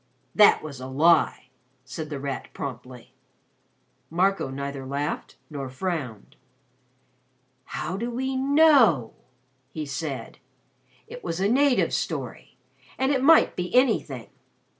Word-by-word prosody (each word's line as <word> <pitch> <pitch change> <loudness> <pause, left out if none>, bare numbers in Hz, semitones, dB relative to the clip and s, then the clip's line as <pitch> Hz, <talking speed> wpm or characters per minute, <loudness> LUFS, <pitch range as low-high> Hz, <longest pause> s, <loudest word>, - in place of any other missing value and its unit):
"That 210 -6 +6
was 140 -4 -8
a 130 - -6
lie," 145 -1 +2 0.4
said 155 +4 -7
The 145 -3 -5
Rat 140 0 -5
promptly. 125 -2 -8 1.0
Marco 185 -2 +1
neither 140 0 -5
laughed 140 +3 -4
nor 140 -3 -6
frowned. 130 - -5 1.3
"How 180 +4 -4
do 235 +4 -3
we 265 +2 -3
know?" 265 - +4 0.6
he 155 -1 -5
said. 140 -1 -5 0.7
"It 245 - -11
was 165 0 -4
a 195 - +2
native's 270 +3 +2
story, - - -5 0.4
and 265 +1 +1
it 270 -2 +1
might 320 +4 +5
be 180 +4 -4
anything. 255 -1 +1
160 Hz, 120 wpm, -25 LUFS, -, 1.3 s, That